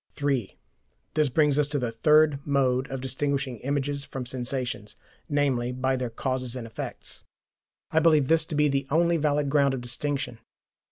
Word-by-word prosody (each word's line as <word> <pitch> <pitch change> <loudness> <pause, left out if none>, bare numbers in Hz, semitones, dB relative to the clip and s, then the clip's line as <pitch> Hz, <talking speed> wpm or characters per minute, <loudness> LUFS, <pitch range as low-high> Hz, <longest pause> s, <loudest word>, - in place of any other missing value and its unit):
(3) 135 -8 -1 0.6
This 155 -2 +2
brings 150 +1 +3
us 145 - +2
to 145 0 -2
the 125 -4 -1
third 150 +4 +4
mode 135 -2 +1
of 135 -1 -4
distinguishing 135 -1 -2
images 140 +2 -2
from 135 -2 -6
sensations, 125 -4 -3 0.3
namely, 135 -4 +1
by 130 +1 0
their 125 -2 -2
causes 130 +1 -3
and 125 -2 -5
effects. 115 - -7 0.7
I 160 - +4
believe 155 -4 +4
this 165 +1 +3
to 155 - -5
be 150 0 +4
the 135 -1 -1
only 170 +2 +3
valid 145 -2 +1
ground 140 -2 +3
of 125 - -5
distinction. 135 0 -2
140 Hz, 165 wpm, -26 LUFS, 125-145 Hz, 0.7 s, third